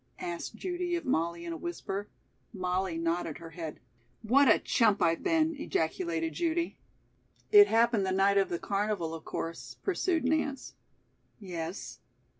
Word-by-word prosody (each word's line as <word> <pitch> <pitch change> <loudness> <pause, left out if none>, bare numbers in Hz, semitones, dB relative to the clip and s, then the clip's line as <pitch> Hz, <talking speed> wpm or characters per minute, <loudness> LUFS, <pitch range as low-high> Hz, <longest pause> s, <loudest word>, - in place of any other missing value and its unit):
asked 175 +5 -5
Judy 355 +4 -2
of 340 - -4
Molly 170 -6 0
in 170 - -4
a - - -5
whisper. 190 +5 -4 0.5
Molly 185 -2 -1
nodded 165 -1 -1
her 165 -1 -10
head. 165 -2 -6 0.4
"What 265 +6 +5
a - - +7
chump 215 -4 +2
I've 165 0 +2
been!" 325 -2 +2
ejaculated 165 - -1
Judy. 340 0 -1 0.7
"It 410 -1 +9
happened 225 -3 +3
the - - 0
night 195 +1 +4
of 195 - +1
the 170 - -1
carnival, 200 -4 -1
of 165 -1 -7
course," 165 0 -5
pursued 360 -3 0
Nance. 280 -1 -1 0.7
"Yes." 175 -2 -6
195 Hz, 145 wpm, -30 LUFS, 170-280 Hz, 0.7 s, It